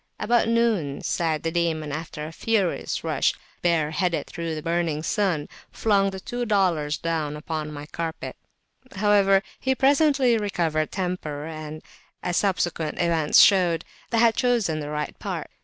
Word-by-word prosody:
About 235 0 +2
noon 225 -12 +1
Sa'ad 160 -3 -1
the 165 - -1
Demon, 160 -3 -1
after 155 0 -5
a 155 - -7
furious 200 0 -1
rush, - - +1 0.3
bare 165 -3 +2
headed, 170 +1 0
through 165 -1 -4
the 155 - -6
burning 165 -2 -1
sun, 175 -5 0 0.2
flung 200 -3 +2
the 190 0 -6
two 245 +5 -4
dollars 180 -9 +1
down 155 -3 -2
upon 155 0 -4
my 145 -1 -7
carpet: 165 +1 -5 0.6
however, 195 -1 +4 0.2
he 265 0 +1
presently 275 -3 +3
recovered 165 -7 -1
temper, 180 -6 -3
and, 155 -1 -7 0.4
as 175 - -1
subsequent 175 -5 0
events 165 -3 +2
showed, 180 -4 +4 0.3
I 230 - +1
had 230 0 +5
chosen 225 -11 +1
the 145 -1 -5
right 150 -1 -3
part. - - -5
170 Hz, 150 wpm, -25 LUFS, 155-205 Hz, 0.6 s, had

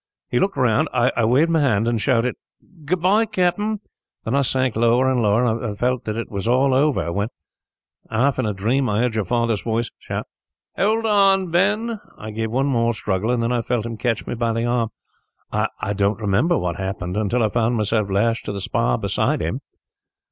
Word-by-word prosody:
He 120 - +2
looked 195 -5 0
round. 120 -5 +2
I 125 -1 +1
waved 140 +9 +3
my 165 - +3
hand 115 -6 +2
and 115 -2 0
shouted, 125 +1 +1 0.5
'Goodbye, 185 +7 +2
Captain!' 205 +2 0 0.4
Then 110 - -2
I 140 - +3
sank 130 -2 0
lower 120 +3 +3
and 130 -2 +2
lower, 105 +2 +3 0.2
and 105 -4 -4
felt 125 +1 0
that 110 0 -3
it 115 - -5
was 100 +1 -3
all 130 +2 +3
over, 135 - +1
when, 100 +3 -1 0.8
half 130 +5 +1
in 125 - 0
a - - 0
dream, 120 +6 0
I 105 - 0
heard 125 -2 0
your 110 -2 -1
father's 115 0 0
voice 115 0 -2
shout, - - -5 0.5
'Hold 220 +3 +1
on, 195 -4 +3
Ben!' 210 +6 +1 0.2
I 110 0 -7
gave 110 +1 -3
one 130 +4 0
more 115 -4 +1
struggle, 105 0 -1
and 120 -1 +1
then 115 - 0
I 120 -1 +1
felt 115 0 -1
him 115 -1 -4
catch 115 -1 -1
me - - -4
by 115 -1 -1
the 115 +1 -1
arm. 120 -2 0 0.6
I 100 - -2
don't 100 +1 0
remember 110 - +2
what 90 -1 -2
happened, 95 -1 -4
until 110 +3 +1
I 110 - +2
found 115 +2 +1
myself 105 -1 0
lashed 115 +4 +1
to - - -3
the 100 - -4
spar 60 -8 0
beside - - 0
him. - - -3
120 Hz, 200 wpm, -21 LUFS, 110-135 Hz, 0.8 s, waved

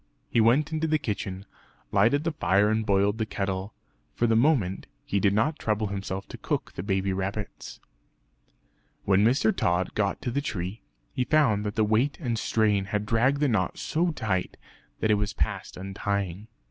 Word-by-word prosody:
He 115 - +4
went 135 +7 +3
into 160 0 0
the 155 0 +2
kitchen, 100 -6 -4 0.5
lighted 120 +9 +3
the 165 - 0
fire 105 -7 +2
and 110 0 +1
boiled 100 +1 +2
the 110 - +1
kettle; 95 0 -3 0.4
for 120 - +1
the 115 -1 +3
moment 115 - +2 0.2
he 100 - 0
did 100 0 +3
not 130 +10 +1
trouble 110 0 0
himself 95 -1 -4
to - - -9
cook - - -3
the - - -5
baby 95 0 0
rabbits. 95 +3 -5 1.3
When 100 +1 +4
Mr. 115 -1 +3
Tod 90 -2 0
got 100 -2 0
to 120 - -1
the 140 +4 0
tree, 100 -5 -4 0.3
he 125 - 0
found 130 -7 +3
that 105 - -4
the 110 - +3
weight 110 +7 +1
and 120 -8 -2
strain 105 -4 +1
had 105 +1 -2
dragged 125 +6 +2
the 145 - +4
knot 105 -7 0
so 170 +3 0
tight 100 - -2 0.4
that 110 - +2
it 105 - +3
was 105 -1 -2
past - - -3
untying. 95 +1 -3
105 Hz, 180 wpm, -27 LUFS, 100-120 Hz, 1.3 s, He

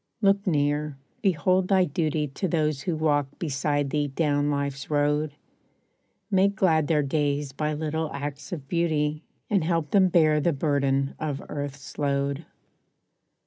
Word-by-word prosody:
Look 200 -1 +2
near, 145 -2 0 0.2
behold 185 +1 +2
thy 190 -2 +4
duty 155 -1 -1
To 165 +8 -3
those 155 -4 0
who 170 +2 -1
walk 145 -3 +1
beside 145 -2 -1
thee 145 -1 +1
down 145 0 0
life's 140 -1 -2
road; 150 0 +1 1.0
Make 195 +1 +3
glad 160 -6 +3
their 150 -2 +2
days 145 0 0
by 150 +3 -2
little 155 +1 -2
acts 145 0 -6
of 150 -6 -6
beauty, 155 -2 0 0.3
And 195 -5 +1
help 165 -2 0
them 195 -2 +5
bear 155 -4 +4
the 170 +3 +2
burden 140 -2 +1
of 145 -3 -3
earth's 140 -1 -6
load. 140 +1 -1
150 Hz, 145 wpm, -26 LUFS, 145-165 Hz, 1.0 s, them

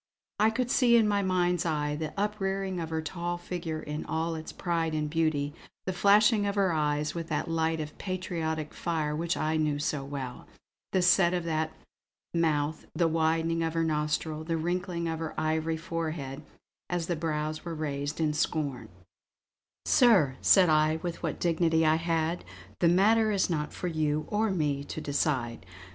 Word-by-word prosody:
I 215 +1 +5
could 245 +2 -1
see 240 -3 +5
in 220 -2 +4
my 205 -1 +2
mind's 180 -3 +1
eye 150 -3 -1
the 155 0 -4
uprearing 195 -2 -1
of 165 -1 -4
her 160 0 -2
tall 175 +1 -3
figure 175 -2 -4
in 150 0 -5
all 165 +1 -1
its 160 0 -6
pride 165 -3 -1
and 155 -1 -1
beauty, 150 -2 0 0.3
the 185 - -1
flashing 205 +3 +4
of 200 - -1
her 195 -4 +2
eyes 150 -1 0
with 165 -1 -5
that - - -1
light 160 0 +1
of 150 0 -5
patriotic 165 -5 -3
fire 155 -3 -1
which 170 +2 -1
I 155 +1 0
knew 150 -2 +1
so 145 -1 -2
well, 135 -3 -6 0.4
the 185 -2 +2
set 180 0 +5
of 175 - -1
her 160 -1 0 0.6
mouth, 155 -2 0
the 170 - +3
widening 165 +1 +1
of 165 0 -1
her 165 - +2
nostril, 155 0 -1
the 165 0 -1
wrinkling 175 +1 -2
of 160 -1 -2
her 160 -1 -4
ivory 160 +1 0
forehead 155 -4 -4 0.5
as 175 -2 -1
the 175 - -1
brows 155 -1 -2
were 170 -2 -5
raised 145 -1 -3
in 155 -2 +1
scorn 145 -3 -2 1.0
"Sir," 190 - +5
said 190 -2 +6
I 155 0 +3
with 175 -1 -4
what - - -3
dignity 165 -1 +2
I 155 0 +4
had, 165 0 -1 0.4
"the 170 - +4
matter 215 +5 +4
is 195 -3 +1
not 150 -2 -1
for - - -6
you 155 -2 0
or 215 +1 +1
me 150 -7 0
to 145 - -6
decide. 135 -6 -1
160 Hz, 175 wpm, -29 LUFS, 155-175 Hz, 1.0 s, said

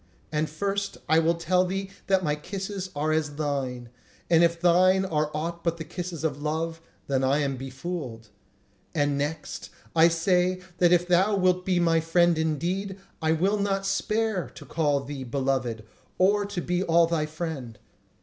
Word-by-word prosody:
And 155 0 0
first, 200 +5 -2
I 160 +1 +5
will 165 +1 +2
tell 175 +2 +2
thee 195 +1 -3 0.2
that 190 -1 +3
my 150 -3 +1
kisses 195 +4 -5
are 150 +2 0
as 155 -2 0
thine; 135 -5 -3 0.4
and 165 0 +6
if 170 0 +2
thine 185 +2 +4
are 155 -4 0
aught 170 +3 -4
but 170 0 0
the 160 - -5
kisses 175 0 -6
of 145 -3 -1
love, 160 +2 -2 0.2
then 135 -1 0
am 130 - +3 0.2
I - - -5
befooled. 130 -3 -6 0.7
And 145 -2 +2
next, 150 +2 -4 0.3
I 165 0 +7
say 180 +2 +2 0.2
that 175 -1 +5
if 175 0 +4
thou 185 +4 +3
wilt 185 -1 +2
be 180 -2 +2
my 165 -1 +3
friend 170 +1 +3
indeed, 175 +5 -1 0.2
I 160 0 +2
will 190 +6 +1
not 195 -1 0
spare 215 0 0
to - - -12
call 145 -4 +1
thee 140 -1 -6
beloved, 130 -3 -1 0.3
or 200 +2 +3
to 200 -3 -3
be 180 +1 -1
all 170 -2 +4
thy 165 -2 0
friend. 155 -8 -5
165 Hz, 170 wpm, -26 LUFS, 150-185 Hz, 0.7 s, I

